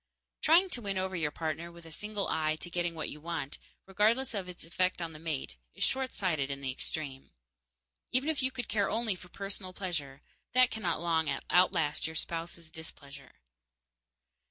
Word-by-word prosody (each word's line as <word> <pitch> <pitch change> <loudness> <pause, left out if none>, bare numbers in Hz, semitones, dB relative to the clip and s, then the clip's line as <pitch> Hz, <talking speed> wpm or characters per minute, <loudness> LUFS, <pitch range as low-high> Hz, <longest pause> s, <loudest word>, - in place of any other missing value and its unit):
Trying 350 +4 +6
to 245 - -1
win 200 -3 -1
over 190 0 0
your 160 -4 +1
partner 160 +2 -3
with 170 -1 -13
a 165 - -10
single 210 +4 -2
eye 155 -1 +2
to 175 +2 -8
getting 175 -1 0
what 155 - -2
you 150 - -8
want, 160 -4 -3 0.3
regardless 220 +7 +3
of 190 -4 -2
its 180 - -7
effect 185 +2 +1
on 165 -2 -3
the 155 - -9
mate, 145 - -3 0.2
is - - -1
short 265 -1 +1
sighted 155 -8 +1
in 140 0 -3
the 135 -1 -1
extreme. 135 0 -4 0.8
Even 260 +4 +3
if 315 -3 +2
you 260 - +3
could 250 -3 -4
care 200 -2 +2
only 225 -2 +3
for 180 -1 -11
personal 195 -1 -4
pleasure, 150 -8 -3 0.3
that 255 -1 +7
cannot 180 -8 0
long 165 -2 +2 0.2
outlast 165 -5 +4
your 160 - -6
spouse's 165 0 -3
displeasure. 140 -5 -8
170 Hz, 180 wpm, -32 LUFS, 155-200 Hz, 0.8 s, that